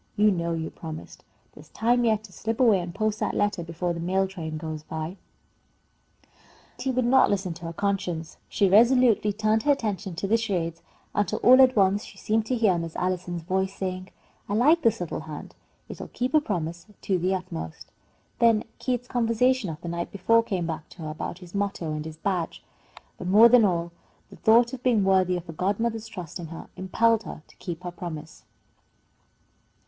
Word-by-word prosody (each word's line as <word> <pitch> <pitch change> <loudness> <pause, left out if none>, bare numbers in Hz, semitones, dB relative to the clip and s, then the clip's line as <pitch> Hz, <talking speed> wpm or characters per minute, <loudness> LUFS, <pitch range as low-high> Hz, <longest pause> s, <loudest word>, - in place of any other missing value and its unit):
You 210 0 +4
know 170 -2 -1
you 160 -1 -3
promised. 160 -1 -9 0.3
There's - - -15
time 240 +2 +2
yet 215 -2 +2
to 210 - -13
slip 225 +5 -4
away 225 -7 +5
and 175 -1 -5
post 215 0 -1
that - - -1
letter 205 -3 0
before 170 +1 -3
the 170 - -6
mail 190 +3 +1
train 160 -5 -6
goes 155 -1 -5
by." 160 +4 -6 1.1
But - - -31 0.5
Betty 265 - -3
would 255 -1 +1
not 265 +2 +5
listen 190 -3 -1
to 170 +1 -10
her 165 - -5
conscience. 180 -4 -2
She 200 - +2
resolutely 230 +1 +5
turned 215 +1 +1
her 290 - +3
attention 205 -8 -2
to 185 - -3
the 220 +4 +3
charades, 170 -7 -2 0.3
until 205 +1 0
all 255 +2 +8
at 255 -1 +5
once 200 0 +3
she - - -13
seemed 220 0 0
to 255 - 0
hear 210 -7 +3
Miss 165 -1 -6
Allison's 180 -2 -2
voice 190 +2 -1
saying, 185 -1 -4 0.4
"I 205 - 0
like 300 +9 +4
this 225 -6 +2
little 175 - -3
hand. 155 -1 -8 0.3
It - - -9
will - - -6
keep 250 +3 -3
a 310 - +5
promise 170 - -4
to 190 -2 0
the 185 +2 +1
utmost." 80 - -7 0.5
Then 230 -2 +4 0.2
Keith's 245 -1 -2
conversation 245 -1 +1
of 155 -1 -6
the 170 - -7
night 170 0 -3
before 230 +4 +3
came 190 -6 -2
back 160 -2 -5
to 170 - -11
her 155 - -4
about 155 +2 -5
his 175 - -16
motto 200 -5 -2
and 150 0 -4
his 160 -1 -8
badge. 180 -1 -2 0.6
But 180 - -5
more 215 +5 +8
than 245 -1 +6
all, 170 -2 0 0.4
the - - -11
thought 235 +3 +4
of 255 - -6
being 240 -5 +3
worthy 185 -1 +3
of 175 - -7
her 165 - -8
godmother's 220 +6 -1
trust 180 -6 -8
in 170 - -6
her 165 +1 -9
impelled 225 +4 +2
her 155 - -9
to - - -21
keep 175 -1 -6
her 175 - -4
promise. 165 -2 -8
190 Hz, 200 wpm, -26 LUFS, 170-225 Hz, 1.1 s, all